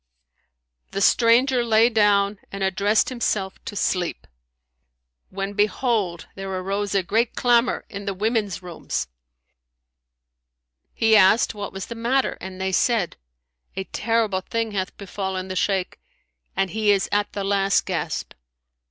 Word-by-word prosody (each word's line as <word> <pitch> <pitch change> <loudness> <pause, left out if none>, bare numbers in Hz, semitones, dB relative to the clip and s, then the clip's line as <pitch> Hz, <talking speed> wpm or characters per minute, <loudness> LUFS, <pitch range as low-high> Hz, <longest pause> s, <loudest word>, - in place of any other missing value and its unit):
The 195 - -1
stranger 240 +4 +4
lay 225 0 +4
down 205 -3 +2
and 195 0 -4
addressed 200 +3 +2
himself 210 -6 -2
to - - -6
sleep, 180 -3 -1 1.0
when, 195 +1 -4
behold, 210 -3 0
there 195 0 -6
arose 195 +2 -2
a 195 - +2
great 225 +6 0
clamour 240 0 +2
in 200 -1 -7
the 200 -2 -2
women's 210 -2 -1
rooms. 175 - -4 1.8
He 225 -1 +3
asked 210 +3 +5
what 205 -1 -6
was 190 -1 -6
the - - -7
matter 240 +3 0
and 190 0 -8
they 190 0 -1
said, 205 -1 +1 0.6
"A 190 - -2
terrible 220 -2 0
thing 230 +3 -2
hath 190 -2 -3
befallen 190 -1 -4
the 185 - -4
Shaykh 190 -1 -1 0.6
and 195 -2 0
he 215 -1 0
is 200 -2 +3
at 205 0 0
the 200 - -3
last 195 0 +2
gasp." - - -3
200 Hz, 135 wpm, -23 LUFS, 190-225 Hz, 1.8 s, asked